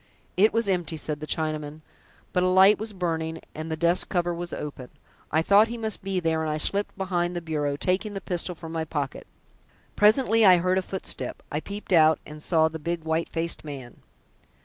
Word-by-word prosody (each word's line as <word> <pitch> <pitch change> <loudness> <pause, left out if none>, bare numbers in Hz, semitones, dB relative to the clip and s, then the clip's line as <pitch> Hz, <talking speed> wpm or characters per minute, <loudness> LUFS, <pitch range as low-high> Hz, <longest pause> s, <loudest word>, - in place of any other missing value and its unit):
"It 210 +4 +5
was 230 -1 0
empty," 175 -4 0
said 150 -1 -3
the 155 - -7
Chinaman, 155 -1 -3 0.5
"but 180 - +2
a 185 - +3
light 190 +3 +6
was 220 +1 -5
burning, 165 -4 -3
and 155 +1 -6
the - - 0
desk 170 +2 +2
cover 175 -2 0
was 175 0 -5
open. 140 -4 -6 0.4
I 160 - +2
thought 205 +5 +5
he 235 +1 -5
must 220 -2 -4
be 195 -1 -1
there, 160 -2 0
and 160 - -2
I 155 - -1
slipped 200 +6 0
behind 180 -2 -1
the - - -1
bureau, 150 -4 -2
taking 190 +7 0
the - - -2
pistol 180 0 -2
from 160 0 -9
my 165 -1 -2
pocket. 145 -4 -4 0.7
Presently 225 +1 +4
I 185 -3 +8
heard 185 +2 +1
a - - -1
footstep. 190 0 -4
I 150 - -1
peeped 200 +3 -6
out 160 -2 +6
and 150 0 -10
saw 160 0 +3
the 160 0 -6
big 170 +1 -3
white 160 +1 -1
faced 165 0 -1
man." 135 -5 -8
170 Hz, 205 wpm, -26 LUFS, 155-190 Hz, 0.7 s, I